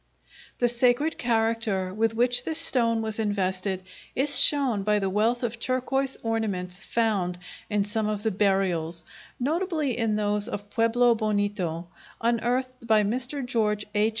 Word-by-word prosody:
The 245 - +2
sacred 245 +6 +1
character 225 -5 0
with 225 +2 0
which 245 +1 +2
this 320 +3 0
stone 230 -7 +3
was 220 0 -3
invested 190 -2 -1 0.3
is 285 +2 +6
shown 265 -8 +4
by 210 +1 +1
the 195 -2 -1
wealth 225 +5 0
of 235 -1 -3
turquoise 265 +2 0
ornaments 200 -6 -3
found 205 -6 -1 0.3
in 205 -2 0
some 215 +1 -1
of 210 -1 -3
the 220 - 0
burials, 185 -5 0 0.3
notably 310 - -1
in 225 -3 0
those 210 0 0
of 205 0 -7
Pueblo 235 +1 +3
Bonito, 205 -6 -2 0.3
unearthed 240 +2 -1
by 215 -2 +4
Mr. 250 +6 -2
George 210 -4 0
H. 210 +1 +2
225 Hz, 145 wpm, -25 LUFS, 205-245 Hz, 0.3 s, is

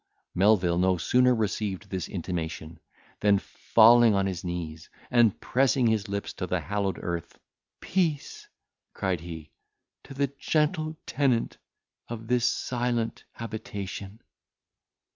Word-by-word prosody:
Melvil 90 -3 +3
no 95 0 +3
sooner 125 +8 +3
received 105 -3 -2
this 95 -3 -3
intimation, 85 -3 -5 0.4
than 100 -1 +4
falling 115 +2 +5
on 100 0 +2
his 95 -3 -3
knees, 85 -3 -5 0.2
and 120 -4 +4
pressing 130 0 +2
his 110 -2 +1
lips 100 0 -4
to - - -4
the - - 0
hallowed 100 -1 -2
earth, 85 -1 -4 0.4
"Peace," 165 -6 -1 0.5
cried 95 -3 -1
he, 80 -2 -9 0.5
"to 135 - -10
the 140 0 -1
gentle 155 0 0
tenant 130 -5 0 0.5
of 115 -1 -6
this 120 0 +1
silent 120 -2 -1
habitation." 105 -2 -7
105 Hz, 120 wpm, -27 LUFS, 90-120 Hz, 0.5 s, falling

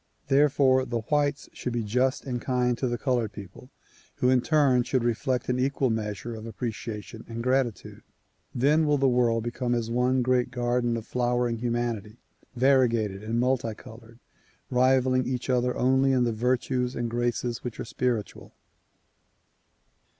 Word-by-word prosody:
Therefore 135 -2 +4
the 120 -2 -3
whites 145 0 +1
should 125 - -4
be 120 -1 -1
just 125 +7 0
and 125 -3 -3
kind 125 -1 +1
to 130 - 0
the 120 0 -2
colored 120 -4 0
people 100 +5 -11 0.5
who 125 - +2
in 130 -1 +4
turn 140 -4 +3
should 125 0 0
reflect 125 +2 -1
an 125 0 0
equal 135 -1 +1
measure 110 +1 -3
of 110 0 -8
appreciation 110 -1 -6
and 115 0 -5
gratitude. 130 -3 -1 0.5
Then 150 +5 +3
will 145 0 +3
the 135 0 +2
world 120 -3 +2
become 120 +1 -2
as 115 -1 -2
one 125 +1 +2
great 125 0 +1
garden 120 -1 0
of 110 - -7
flowering 120 -1 0
humanity, 120 -3 -2 0.4
variegated 120 -6 +2
and 115 +2 -1
multi 125 -3 0
colored, 115 +1 -14 0.5
rivaling 130 0 +3
each 130 0 -2
other 125 0 +1
only 130 +1 +3
in 125 -1 +3
the 120 -1 0
virtues 125 +2 0
and 120 - -2
graces 120 0 -2
which 120 -3 -6
are - - -4
spiritual. 120 -3 -3
125 Hz, 155 wpm, -26 LUFS, 115-130 Hz, 0.5 s, Therefore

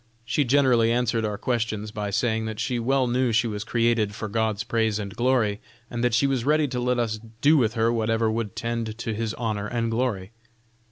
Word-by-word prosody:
She 120 +6 +1
generally 125 -3 +4
answered 115 -2 +1
our 105 -1 -2
questions 110 -3 -2
by 105 -1 -3
saying 110 +2 0
that 110 -1 -5
she 120 +2 -1
well 130 +3 +2
knew 125 0 +1
she 110 +2 +2
was 105 -2 -3
created 115 -3 +1
for 110 - -4
Gods 110 0 -1
praise 110 -3 0
and 100 -2 -5
glory, 120 -4 +1 0.3
and 120 0 -3
that 120 -2 +2
she 130 - +3
was 135 -3 0
ready 150 +2 +2
to 125 - -3
let 125 0 +1
us 110 -2 -1 0.2
do 150 +2 +5
with 115 -5 +2
her 115 +1 +2
whatever 115 0 +1
would 115 -1 -3
tend 115 -1 -3
to 115 -1 -3
His 110 0 -3
honor 110 -3 -2
and 115 0 -1
glory." 115 -5 -1
115 Hz, 210 wpm, -25 LUFS, 110-120 Hz, 0.3 s, do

